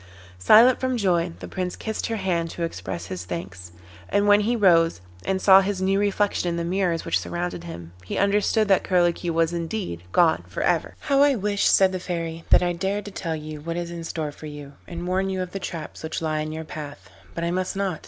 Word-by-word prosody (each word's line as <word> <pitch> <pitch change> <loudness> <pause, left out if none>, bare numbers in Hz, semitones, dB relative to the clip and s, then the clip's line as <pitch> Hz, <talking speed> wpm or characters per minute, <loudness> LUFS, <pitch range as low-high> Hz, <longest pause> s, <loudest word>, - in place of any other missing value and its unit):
Silent 230 - +6
from 255 -1 0
joy, 175 -5 +1
the - - -6
Prince 180 -1 -3
kissed 220 -1 -4
her 225 - -2
hand 175 -5 -1
to 170 - -5
express 95 - -4
his 90 -1 -6
thanks, 90 0 -7 0.4
and 205 +1 +2
when 205 0 +6
he 225 +4 +1
rose 170 - +4 0.3
and 190 0 0
saw 190 0 +7
his 195 0 -2
new 195 +1 +1
reflection 205 -2 +1
in 170 - -2
the 170 - -1
mirrors 175 -1 0
which 165 - +1
surrounded 175 0 -4
him, 85 - -8
he 95 - -5
understood 205 +2 +2
that 195 -2 +3
Curlicue 175 -1 +1
was 165 +1 +1
indeed 170 - -4
gone 170 - +3
for - - -4
ever. - - 0
'How 275 -1 +2
I 285 -1 +5
wish,' 205 -1 +1
said 190 -1 +5
the 185 - -3
Fairy, 165 -2 -4
'that - - +6
I 175 0 +1
dared 195 +4 -2
to 205 - -7
tell 165 -4 -3
you 155 -1 -7
what 165 +2 -4
is 170 -1 -4
in 170 -1 -6
store 160 -2 -4
for 155 +1 -10
you, 145 -1 -9
and 175 0 -6
warn 190 +2 0
you 190 -1 -2
of 180 -1 -4
the 195 - -4
traps 165 -4 -6
which 160 - -4
lie 155 -1 -1
in 155 0 -3
your 160 +1 -5
path, 145 -12 -9 0.2
but 170 - -3
I 170 - 0
must 185 +1 -2
not. 195 -4 -2
175 Hz, 230 wpm, -24 LUFS, 160-195 Hz, 0.4 s, saw